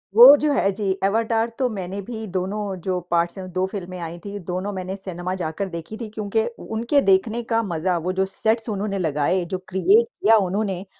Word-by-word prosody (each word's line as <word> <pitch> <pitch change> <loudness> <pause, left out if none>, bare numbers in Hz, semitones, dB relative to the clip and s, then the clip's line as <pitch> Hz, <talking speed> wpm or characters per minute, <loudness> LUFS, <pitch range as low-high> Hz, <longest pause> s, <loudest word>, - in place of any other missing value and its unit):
वो 250 +5 +11
जो 300 0 +1
है। 195 - +2
जी, 200 0 -2
एवाटार 225 +3 +1
तो 255 - +2
मैंने 195 -2 -5
भी 220 +1 -6
दोनों 195 +2 -3
जो 185 -1 +1
पार्ट्स 170 +2 +1
हैं 185 - -6
2 185 0 +1
फ़िल्में 185 -2 -6
आई 170 0 -6
थी। 205 0 -5
दोनों 185 +3 -2
मैंने 185 +1 -4
सिनेमा 185 -2 -5
जाकर 180 +2 -3
देखी 170 +5 -7
थी 220 - -5
क्योंकि 215 +1 -1 0.2
उनके 235 +6 +2
देखने 215 +4 +2
का 230 - +3
मज़ा 175 -2 -1
वो 175 +3 -2
जो 190 +1 +1
सेट्स 220 +4 0
उन्होंने 200 -1 -2
लगाए 160 +2 +1
जो - - +1
क्रिएट 190 +5 +4
किया 225 -1 +3
उन्होंने 195 -1 -2
195 Hz, 195 wpm, -23 LUFS, 185-220 Hz, 0.2 s, वो